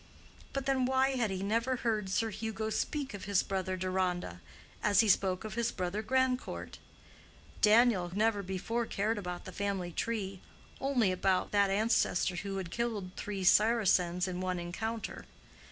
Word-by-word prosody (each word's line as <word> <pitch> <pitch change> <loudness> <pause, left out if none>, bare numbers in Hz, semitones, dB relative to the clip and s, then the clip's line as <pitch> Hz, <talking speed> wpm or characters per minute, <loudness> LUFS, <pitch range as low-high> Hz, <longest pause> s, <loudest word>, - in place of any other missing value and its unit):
But 275 -1 -3
then, 265 -2 +2
why 265 +1 +3
had 245 -5 0
he 190 0 -3
never 230 +5 +1
heard 220 -5 -1
Sir 220 +3 0
Hugo 220 +1 -3
speak 280 +2 -2
of 200 -1 -7
his 200 -2 +2
brother 185 -1 -2
Deronda, 180 - -2 0.4
as 205 -2 +5
he 225 - +1
spoke 190 -1 +2
of 215 -2 -6
his 235 +2 0
brother 185 +2 -2
Grandcourt? 260 +2 -1 0.8
Daniel 215 -4 +5
had 180 - -7
never 215 -1 +2
before 200 +5 -2
cared 210 +2 -1
about 180 -2 -6
the - - -7
family 195 -3 -2
tree—only 220 +4 -2
about 185 0 +1
that 200 -1 +3
ancestor 195 -3 +1
who 195 0 -4
had 185 -3 -5
killed 220 -6 -2
three 200 -2 -4
Saracens 185 -4 +4
in 180 0 -4
one 185 -1 -1
encounter. 220 +6 -4
205 Hz, 155 wpm, -32 LUFS, 185-230 Hz, 0.8 s, as